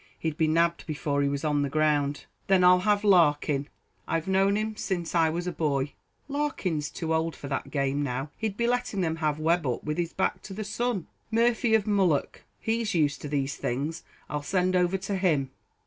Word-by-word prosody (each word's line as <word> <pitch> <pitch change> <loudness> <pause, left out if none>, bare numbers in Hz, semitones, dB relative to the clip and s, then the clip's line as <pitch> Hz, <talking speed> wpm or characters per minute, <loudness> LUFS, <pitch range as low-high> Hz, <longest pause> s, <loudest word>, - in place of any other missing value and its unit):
He'd 160 -2 -2
be 160 0 +2
nabbed 170 +2 +1
before 145 -2 -1
he 140 - +2
was 140 +2 -3
on 150 -1 +2
the 140 - 0
ground." 145 -1 +1 0.2
"Then 190 -2 +4
I'll 180 0 +7
have 205 +2 +2
Larkin; 150 -7 +3 0.4
I've 165 +1 -1
known 195 +1 +3
him 215 0 -2
since 175 -5 -3
I 165 -2 +4
was 170 +2 -3
a 180 - -1
boy." 145 -4 -1 0.3
"Larkin's 265 - -2
too 160 -1 -3
old 160 0 0
for 140 - -8
that 135 - -3
game 140 0 0
now; 135 +1 -3
he'd 215 -3 -2
be 235 - +1
letting 245 -4 0
them 165 -2 0
have 155 -2 0
Webb 165 0 +1
up 125 - -2
with 150 +2 -2
his 170 -1 -1
back 190 - 0
to 195 - -9
the 215 - -3
sun." 220 -2 -2 0.2
"Murphy, 230 0 +3
of 215 -2 +2
Mullough; 190 -8 +1 0.2
he's 225 -3 -1
used 145 -3 +1
to - - -5
these 140 -1 -1
things 145 +7 -2 0.3
I'll 150 0 -3
send 185 +4 +1
over 180 +1 +2
to 195 +1 -3
him." 150 -8 +1
165 Hz, 205 wpm, -27 LUFS, 145-195 Hz, 0.4 s, I'll